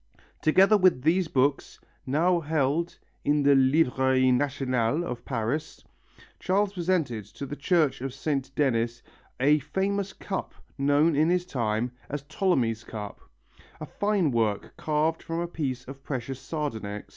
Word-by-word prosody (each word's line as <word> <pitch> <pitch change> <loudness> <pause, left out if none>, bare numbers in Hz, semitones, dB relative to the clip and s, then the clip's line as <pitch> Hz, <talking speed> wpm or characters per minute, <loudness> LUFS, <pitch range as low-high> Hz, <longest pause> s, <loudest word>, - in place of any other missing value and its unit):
Together 190 +7 +5
with 185 -10 +3
these 175 +3 +2
books, 140 0 0 0.3
now 170 +6 +2
kept 155 +2 0 0.3
in 145 0 +2
the 140 0 +6
Librairie 130 -2 +3
Nationale 130 +1 0
of 125 -8 -5
Paris, 125 +5 -3 0.6
Charles 200 +2 +1
presented 170 - -1
to 105 +7 -8
the 145 - -6
Church 155 -3 +1
of 135 0 -3
Saint 135 0 -2
Denis 120 -4 0 0.4
a 145 +4 +4
famous 195 +6 -2
cup 195 - -5 0.2
known 145 +3 +3
in 155 +3 +3
his 180 0 +1
time 120 -6 -1 0.2
as 145 0 -4
Ptolemy's 135 - 0
cup, 105 -2 -7 0.6
a 155 - -5
fine 200 -2 0
work 110 -4 -1
carved 155 +1 0
from 165 0 -4
a 175 - -2
piece 130 -7 -4
of 135 +1 -9
precious 130 -1 -4
sardonyx. 110 -11 -4
145 Hz, 140 wpm, -27 LUFS, 130-165 Hz, 0.6 s, the